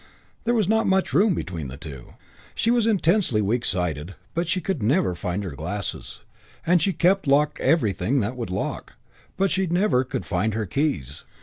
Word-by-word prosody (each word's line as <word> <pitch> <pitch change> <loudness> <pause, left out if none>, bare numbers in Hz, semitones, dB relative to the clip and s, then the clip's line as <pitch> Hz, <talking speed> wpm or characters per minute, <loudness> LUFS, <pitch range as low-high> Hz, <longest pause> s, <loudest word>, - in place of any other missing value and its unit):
There 240 +1 +2
was 215 -5 +2
not 220 +2 +2
much 190 0 +1
room 200 -1 +4
between 85 - -4
the 65 +2 -8
two. 70 -5 -10 0.4
She 230 - +1
was 240 -2 +3
intensely 185 - +3
weak 110 +4 0
sighted, 90 -1 -2 0.2
but 170 +1 -1
she 180 +2 0 0.2
never 125 - +2
could 90 - -7
find 90 +3 -2
her 95 - -5
glasses; 90 +8 -5 0.4
and 175 0 +4
she 195 - +2
kept 185 +1 +2
locked 145 +2 +3
everything 115 - +1
that 115 +5 -2
would 120 -5 -5
lock, 95 +2 -4 0.4
but 195 +1 +2
she 190 0 +1
never 170 -7 +2
could 130 0 -5
find 105 +3 -1
her 110 -1 -1
keys. 90 - -2
130 Hz, 185 wpm, -24 LUFS, -, 0.4 s, room